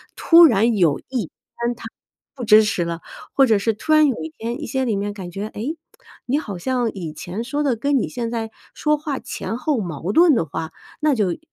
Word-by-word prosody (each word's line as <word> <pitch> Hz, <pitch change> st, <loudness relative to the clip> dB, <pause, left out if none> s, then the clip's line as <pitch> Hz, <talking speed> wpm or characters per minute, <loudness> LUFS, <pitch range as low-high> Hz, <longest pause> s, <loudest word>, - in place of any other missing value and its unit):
突 340 Hz, 0 st, +7 dB
然 230 Hz, -3 st, +3 dB
有 165 Hz, -7 st, +3 dB
一 250 Hz, -7 st, -1 dB
天 235 Hz, +8 st, -5 dB
他 -, -, -12 dB, 0.5 s
不 250 Hz, -, -6 dB
支 215 Hz, 0 st, +7 dB
持 210 Hz, -5 st, 0 dB
了， 170 Hz, 0 st, -4 dB, 0.3 s
或 270 Hz, -, +5 dB
者 220 Hz, -4 st, +3 dB
是 225 Hz, +2 st, +1 dB
突 310 Hz, +9 st, -4 dB
然 310 Hz, -1 st, +6 dB
有 260 Hz, -, 0 dB
一 160 Hz, -, -5 dB
天 235 Hz, +2 st, -4 dB
一 -, -, -4 dB
些 265 Hz, -1 st, -1 dB
里 220 Hz, -4 st, 0 dB
面 205 Hz, +1 st, -2 dB
感 190 Hz, -4 st, -7 dB
觉， 200 Hz, +4 st, -5 dB
诶 240 Hz, +9 st, -4 dB, 0.5 s
你 275 Hz, +4 st, +1 dB
好 205 Hz, -, -6 dB
像 245 Hz, +3 st, -1 dB
以 170 Hz, -6 st, -5 dB
前 180 Hz, +8 st, -5 dB
说 290 Hz, +4 st, -2 dB
的 275 Hz, -5 st, +1 dB
跟 275 Hz, +4 st, +1 dB
你 -, -, -2 dB
现 235 Hz, -2 st, -4 dB
在 225 Hz, -1 st, -3 dB, 0.2 s
说 300 Hz, 0 st, +1 dB
话 290 Hz, -3 st, -4 dB
前 225 Hz, -, -5 dB
后 300 Hz, +1 st, 0 dB
矛 175 Hz, 0 st, -4 dB
盾 335 Hz, +1 st, +6 dB
的 170 Hz, -, +1 dB
话， 160 Hz, +2 st, -5 dB, 0.3 s
那 305 Hz, -1 st, +3 dB
就 200 Hz, -8 st, 0 dB
230 Hz, 240 characters per minute, -21 LUFS, 195-270 Hz, 0.5 s, 突